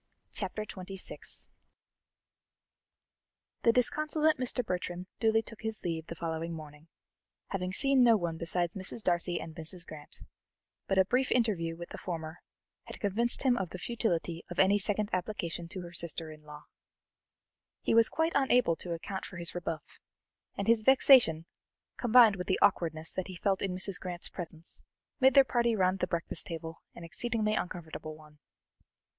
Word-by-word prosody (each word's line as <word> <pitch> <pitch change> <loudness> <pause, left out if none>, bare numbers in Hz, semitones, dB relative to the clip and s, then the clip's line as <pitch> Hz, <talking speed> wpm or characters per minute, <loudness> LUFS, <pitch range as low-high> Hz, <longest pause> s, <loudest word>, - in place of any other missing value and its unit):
Chapter 205 +2 -4
XXVI 190 -1 -3 2.2
The 230 - +5
disconsolate 305 +5 +2
Mr. 250 -1 -1
Bertram 180 -1 -3
duly 225 0 +3
took 225 - -13
his 220 -2 -4
leave 165 -2 -3
the 170 - -6
following 165 0 -3
morning, 150 0 -11 0.6
having 185 -2 -2
seen 270 +5 +3
no 230 -2 +6
one 170 -4 -2
besides 175 +1 0
Mrs. 200 +3 -1
Darcy 175 -1 +1
and 160 - -7
Mrs. 170 +2 -5
Grant, 155 -2 -10 0.6
but 195 - 0
a 190 - +6
brief 255 +6 +1
interview 190 -9 +1
with 170 0 -8
the - - -8
former 160 -2 -5 0.5
had - - -10
convinced 225 +6 +1
him 255 -3 +4
of 190 -6 -2
the 185 - -7
futility 175 -6 -2
of 175 - -7
any 200 +2 +4
second 210 +1 0
application 175 -3 -3
to 185 +2 -6
her 175 0 -9
sister 165 -2 -2
in 155 0 -13
law. 150 0 -12 1.2
He - - +1
was 230 0 +6
quite 320 +1 0
unable 250 -10 +3
to 175 - -5
account 190 +3 -5
for 185 - -7
his 170 0 -4
rebuff, 165 -3 -5 0.6
and 200 - -3
his 230 -1 +4
vexation, 245 - +6 0.5
combined 230 -4 +6
with 180 - -5
the 185 - +2
awkwardness 160 -4 +2
that 185 - -4
he 185 - -8
felt 195 +2 0
in 190 -2 -1
Mrs. 185 0 +1
Grant's 180 -1 -5
presence, 165 -2 -9 0.4
made 265 0 +5
their 275 - +9
party 235 -3 +1
round 185 -1 +2
the 180 - 0
breakfast 170 -1 -1
table 165 -1 -7
an 170 - -10
exceedingly 215 +5 -1
uncomfortable 160 -5 -5
one. 150 -1 -18
185 Hz, 160 wpm, -31 LUFS, 165-225 Hz, 2.2 s, their